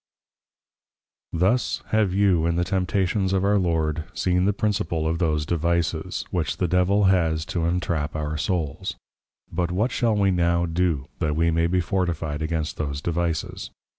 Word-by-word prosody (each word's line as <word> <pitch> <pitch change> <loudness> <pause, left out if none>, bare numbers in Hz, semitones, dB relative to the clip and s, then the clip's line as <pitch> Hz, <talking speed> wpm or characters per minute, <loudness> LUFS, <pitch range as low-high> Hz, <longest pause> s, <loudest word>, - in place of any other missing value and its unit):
_ - - -2
Thus 110 +8 +1
have 110 -3 +2
you 95 -4 +3
in 85 - +1
the 90 - +1
Temptations 95 +1 0
of 95 0 +1
our 100 0 +3
Lord, 80 -3 0
seen 90 0 +1
the 100 - +4
principal 100 -6 -1
of 80 +1 -1
those 75 -3 +1
Devices, 85 +1 -1
which 80 -4 -1
the 90 - +1
Devil 90 +4 +3
has 80 -5 +2
to 85 -2 0
Entrap 85 -4 -1
our 75 0 -2
Souls. 75 -1 -2 0.6
But 85 0 -1
what 105 +8 0
shall 115 -3 +1
we 100 -2 +3
now 85 -1 +2
do, 85 -5 0
that 75 -2 0
we 85 +1 +2
may 80 +1 +2
be 90 +1 +1
fortified 80 -4 -2
against 80 -1 -2
those 70 -2 -3
Devices? 85 0 -2
85 Hz, 165 wpm, -24 LUFS, 80-95 Hz, 0.6 s, the